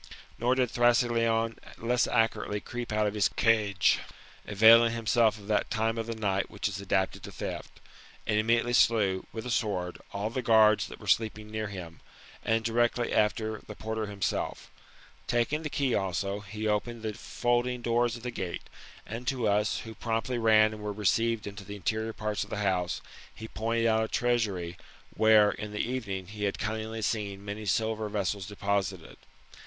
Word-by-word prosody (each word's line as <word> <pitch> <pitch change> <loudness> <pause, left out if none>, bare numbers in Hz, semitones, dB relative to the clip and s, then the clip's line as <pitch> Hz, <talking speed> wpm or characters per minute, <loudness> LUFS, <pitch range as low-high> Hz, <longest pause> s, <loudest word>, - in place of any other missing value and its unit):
Nor 125 +2 +2
did 125 -3 +1
Thrasyleon 115 -2 +2 0.2
less 120 +1 +1
accurately 115 -2 +1
creep 120 +2 -6
out 105 0 +2
of 105 - 0
his 105 -1 +2
cage, 105 -4 +3 0.5
avaiKflg 110 +3 +7
himself 115 -1 +2
of 100 - -13
that 105 -1 0
time 115 0 0
of 115 - -3
the 115 - -3
night 100 -3 -1
which 105 - -2
is 100 -1 -5
adapted 95 -1 0
to - - -9
theft - - -6
j - - -21 0.4
and 105 - +2
immediately 115 +2 +2
slew, 105 -6 +3
with 110 0 -6
a 125 - -3
sword, 95 -7 -1
all 105 +2 -3
the 130 - -2
guards 110 -2 +5
that - - -10
were - - -12
sleeping 110 -1 0
near 110 0 -2
him, 90 -5 -8 0.4
and, 115 0 +1
directly 120 +1 +1
after 110 0 +1
the 105 - -8
porter 110 0 -3
himself. 100 -2 -3 0.6
Taking 120 +6 +1
the 155 - -4
key 140 -3 0
also, 100 +1 -1
he 105 +2 -6
opened 110 +2 -1
the 110 -1 -2
folding 120 +2 -1
doors 120 0 +1
of 115 - -14
the 125 - -3
gate, 90 -5 -4 0.4
and 115 +4 -7
to 125 -3 0
us, 105 +1 +1
who 115 - -8
promptly 115 +2 -2
ran, 110 -1 +5
and 105 - -9
were 105 0 -3
received 110 +2 +1
into 100 0 -7
the 100 +1 -8
interior 110 +3 -2
parts 105 -2 -2
of 105 - -11
the 110 - -4
house, 90 -2 0 0.3
he 110 - -9
pointed 115 +1 -1
out 110 -1 +3
a - - -5
treasury, 105 -9 0 0.4
where 110 -1 +6
in 105 0 -6
the 105 - -6
evening, 105 -7 -3
he 105 +2 -4
had 100 - -1
cunningly 110 +1 -3
seen 100 -2 -2
many 105 +1 -5
silver 110 0 0
vessels 100 -2 -2
deposited. 100 -2 -2
110 Hz, 180 wpm, -29 LUFS, 105-115 Hz, 0.6 s, avaiKflg